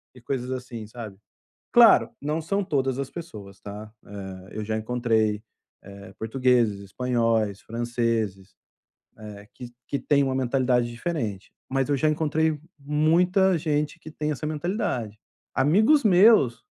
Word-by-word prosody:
e 125 - -15
coisas 125 0 -3
assim, 125 -4 -6
sabe. 110 -3 -9 0.6
Claro, - - +7
não 150 +3 -2
são 195 +5 -1
todas 135 -7 -1
as 140 -1 -4
pessoas, 105 - -9
tá. 105 +1 -9 0.2
Eh, 95 -1 -9
eu 110 - -3
já 110 +1 -2
encontrei, 110 -2 0 0.4
eh, 100 -1 -12
portugueses, 120 -3 +1
espanhóis, 115 -1 0
franceses, 115 -5 -2 0.6
eh, 105 -1 -11
que 120 -1 -10
que 140 - -2
têm 140 0 +2
uma 135 -1 0
mentalidade 125 -2 +1
diferente. 115 - -4 0.2
Mas 135 +1 0
eu 145 - +2
já 155 +3 +2
encontrei 155 0 0 0.2
muita 170 +6 +2
gente 150 0 -1
que 160 - -11
tem 150 0 -3
essa 150 +1 -4
mentalidade. 150 - -3 0.4
Amigos 220 - +4
meus 185 - +5
125 Hz, 135 wpm, -25 LUFS, 110-150 Hz, 0.6 s, Claro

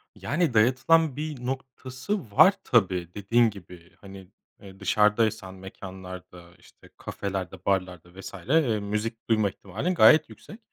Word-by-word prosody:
Yani, 155 -2 -1
dayatılan 130 +7 +3
bir 150 -4 -6
noktası 130 - -5
var, 185 - +6
tabii, 90 -7 +1
dediğin 115 +4 +2
gibi. 90 -3 -14
Hani, 95 -1 -13 0.3
eee, 95 -1 -14
dışarıdaysan 105 -1 +1
mekânlarda, 95 -2 -11
işte, 85 - -21
kafelerde, 95 -2 -6
barlarda 90 -2 -3
vs. 95 -1 -9 0.2
Eee, 135 -8 +2
müzik 105 +3 -4
duyma 110 -3 +2
ihtimalin 105 - -4
gayet 155 -2 +6
yüksek. 210 - -13
105 Hz, 125 wpm, -26 LUFS, 95-130 Hz, 0.3 s, var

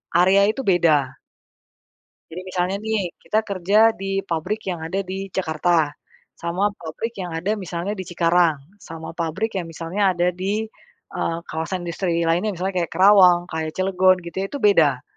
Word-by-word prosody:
area 190 +3 +5
itu 245 - -10
beda. 155 -8 +2 1.1
Jadi 180 +3 -6
misalnya 185 +1 -1
nih, 220 0 -1 0.2
kita 215 - +1
kerja 200 0 0 0.2
di 195 0 -2
pabrik 185 +5 -3
yang 175 - -5
ada 195 +3 -2
di 195 +1 -4
Jakarta, 160 -3 +1 0.5
sama 170 +3 -2 0.2
pabrik 170 +8 -5
yang 175 -2 -5
ada 175 +6 -1
misalnya 175 +2 -4
di - - -3
Cikarang 170 -2 +2 0.3
sama 160 0 -8
pabrik 175 +7 -2
yang 170 - -5
misalnya 165 +4 -5
ada 175 +1 +1
di, 195 +5 -2 0.5
eee, 165 - -1
kawasan 170 +3 -3
industri 170 0 -1
lainnya 175 +6 +1
misalnya 185 +2 -3
kayak 170 - -3
Karawang, 185 -1 +7
kayak 160 -1 -3
Cilegon 185 0 +3
gitu 170 - -9
ya - - -1
itu 285 - -5
beda. 155 -11 +4
180 Hz, 160 wpm, -22 LUFS, 165-195 Hz, 1.1 s, Karawang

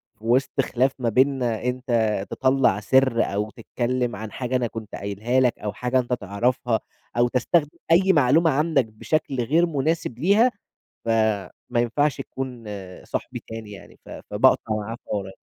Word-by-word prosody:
في 110 - -16
وسْط 130 +3 +2
خلِاف 130 +1 +1
ما 120 -2 +1
بيننا، 125 -2 +1
أنت 120 -5 0
تطلَّع 130 -6 +2
سِر 130 +1 +3
أو 105 +2 -2
تتكلّم 120 +1 -2
عن 110 0 -7
حاجة 130 0 -3
أنا 125 -2 +1
كنت 110 -1 -8
قايلها 105 +6 -1
لك 125 -2 +2
أو 105 -1 -4
حاجة 125 +1 0
أنت 125 0 -2
تعرَفها 115 +2 0 0.4
أو 120 0 +4
تستخدم 145 +5 +1
أي 190 +3 +5
معلومة 150 +3 +4
عندك 150 -2 +2
بشكل 125 +4 -2
غير 165 +8 +3
مناسب 150 -5 -1
ليها 205 - +4 0.5
فما 110 -4 +1 0.3
ينفعش 140 +5 +1
تكون 130 -3 -6 0.4
صاحبي 125 -2 -5
تاني 110 -2 -7
يعني، 100 - -12
ف - - -16 0.2
فباقطَع 110 - +3
معاه 110 +2 -4
فورًا. 100 -2 -2
125 Hz, 150 wpm, -24 LUFS, 110-135 Hz, 0.5 s, أي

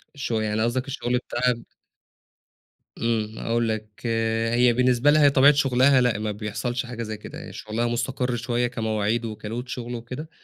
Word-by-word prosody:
شوية 115 -6 -1
يعني 105 +1 0
قصدك 130 +4 -1
الشغل 125 -3 -1
بتاعها 125 -1 -1 1.3
امم، 110 -2 -1
هاقول 115 0 0
لك 110 -1 -3 0.6
هي 120 0 +4
بالنسبة 125 +3 +3
لها 150 -1 +6
طبيعة 140 +2 +6
شُغلها 135 -1 +4
لأ، 120 -4 +2
ما 105 0 -2
بيحصلش 115 +4 -3
حاجة 115 -1 -5
زي 110 -1 -5
كده - - -9
يعني، - - -9
شُغلها 115 +3 -2
مستقر 125 +1 -1
شوية 120 +1 0
كمواعيد 110 -1 -1
وكload 115 +3 -5
شُغل 120 -1 -5
وكده، 125 +7 -7
120 Hz, 155 wpm, -24 LUFS, 110-125 Hz, 1.3 s, لها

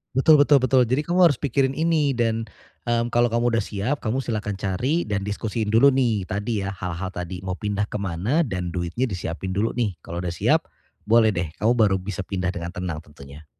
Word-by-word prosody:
Betul 145 +2 +6
betul 145 -1 +5
betul, 130 0 +3
jadi 130 +6 -1
kamu 180 +1 +3
harus 165 -5 +4
pikirin 135 -1 +1
ini, 155 -1 +1
dan, 115 -2 0 0.4
mmm, 120 0 0
kalau 120 -1 +3
kamu 120 0 +1
udah 115 - +1
siap 110 +9 -3
kamu 120 +4 0
silakan 105 -6 -3
cari 125 - -1
dan 100 -1 -1
diskusiin 105 +1 -3
dulu 115 +5 +6
nih 120 -8 +1
tadi 105 +3 -2
ya, 100 - -5
hal-hal 90 0 -4
tadi 90 +1 -5
mau 95 -1 -4
pindah 105 0 -2
ke - - -9
mana 100 - 0
dan 90 - -4
duitnya 90 +9 -1
disiapin 95 -1 -4
dulu 110 +3 +1
nih, 110 -7 -1
kalau 85 +1 -5
udah 90 -1 -3
siap - - +2 0.4
boleh 110 -1 +5
deh 85 -3 -2
kamu 110 +3 +2
baru 100 -3 +4
bisa 95 +1 -5
pindah 95 -2 -1
dengan 85 -1 -6
tenang 90 -4 -4
tentunya. 75 -1 -14
105 Hz, 205 wpm, -23 LUFS, 95-125 Hz, 0.4 s, Betul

